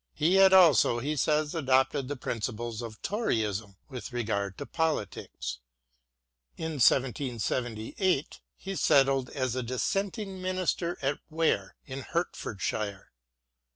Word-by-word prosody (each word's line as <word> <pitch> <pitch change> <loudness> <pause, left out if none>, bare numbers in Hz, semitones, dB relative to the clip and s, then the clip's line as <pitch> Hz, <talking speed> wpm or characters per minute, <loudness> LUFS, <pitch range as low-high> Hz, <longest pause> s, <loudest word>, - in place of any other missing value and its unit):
He 165 +4 +2
had 195 0 +7
also, 165 - +6
he 145 +6 -2
says, 150 +2 +1
adopted 135 -3 +2
the 145 - -3
principles 115 -1 -4
of 115 -2 -8
Toryism 110 - -1
with 130 -1 -7
regard 100 -5 -2
to 145 - -5
politics. 150 - -3 1.0
In 160 -4 -3
1778 125 - +1 0.2
he 195 0 -6
settled 135 -5 +3
as 130 -3 -2
a 130 - -1
Dissenting 190 - -2
minister 185 -2 -1
at 140 +1 0
Ware, 165 0 0
in 135 0 -6
Hertfordshire. 105 - -3
135 Hz, 115 wpm, -29 LUFS, 115-165 Hz, 1.0 s, had